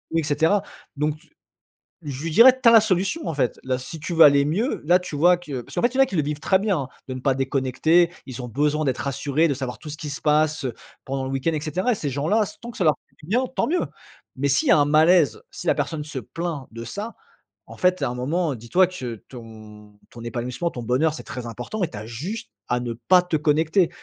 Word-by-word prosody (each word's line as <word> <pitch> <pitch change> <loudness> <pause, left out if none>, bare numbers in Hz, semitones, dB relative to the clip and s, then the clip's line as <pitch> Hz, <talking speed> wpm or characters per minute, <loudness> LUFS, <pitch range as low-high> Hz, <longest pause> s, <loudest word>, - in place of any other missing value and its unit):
et 165 - +2
cetera. 160 +7 +2 0.3
Donc 150 +1 0
t - - -25 0.7
je 140 -1 -6
lui 165 - -2
dirais: 250 +9 +8
«Tu - - +5
as - - +6
la 225 - +9
solution 195 - -1
en - - -1
fait. 130 -4 -1
Là 130 -1 -1
si 140 +5 -8
tu 170 - -4
veux 165 - +8
aller 140 -1 +6
mieux, 210 - -1
là 180 +3 +5
tu 180 -4 -7
vois 175 +4 +5
que» 145 -7 -6
parce - - -13
qu'en - - 0
fait 240 +1 +2
il - - -1
y - - +1
en - - +9
a - - +2
qui 200 - -6
le - - +4
vivent 150 +1 -3
très 190 +4 +2
bien, 200 -2 0
hein, 135 - -4 0.2
de 130 - -4
ne 130 - -7
pas 135 -1 +1
déconnecter. 135 +6 +2
Ils 130 -2 -7
ont 125 - -6
besoin 150 +5 0
d'être 130 -2 0
rassurés, 140 +3 0
de - - +1
savoir 130 -2 -5
tout 155 - -9
ce 150 - -5
qui 150 - -6
se 140 - -5
passe, 155 -1 +2
heu, 125 - -2 0.3
pendant 135 0 -3
le 130 - -4
week-end 135 +5 0
et 150 - -2
cetera 180 - -1
et 230 - +1
ces 150 - -3
gens 140 +3 -2
là 215 +4 +3
s 205 - -8
tant 235 0 -7
que - - -18
ça 190 - 0
leur 155 - +4
fait - - -34
du - - -12
bien, 250 +5 +2
tant - - +1
mieux! 355 +4 0 0.5
Mais 140 +2 0
s'il 140 0 +2
y - - +7
a - - +7
un 145 - +4
malaise, 155 - +4
si - - -8
la - - +4
personne 150 -2 -3
se 150 -3 -5
plaint 160 +2 -5
de 115 +1 -8
ça, 205 - -6 0.5
en - - -11
fait 180 -2 +2
à 135 - +1
un 125 - -5
moment, 150 +4 -1
dis 120 0 -12
toi 185 +5 +5
que 130 -10 -6
ton 110 -3 -13
ton 120 - -12
épanouissement, 125 +8 -3
ton 120 - -7
bonheur, 130 +7 +1
c'est - - -8
très 125 -2 -7
important 120 - -5
et 170 - 0
tu - - -9
as 105 - -7
juste 150 - -6 0.2
à 125 - +1
ne 120 -1 -4
pas 180 +10 +4
te 180 -2 -2
connecter. 160 +4 +2
150 Hz, 275 wpm, -23 LUFS, 130-175 Hz, 0.7 s, la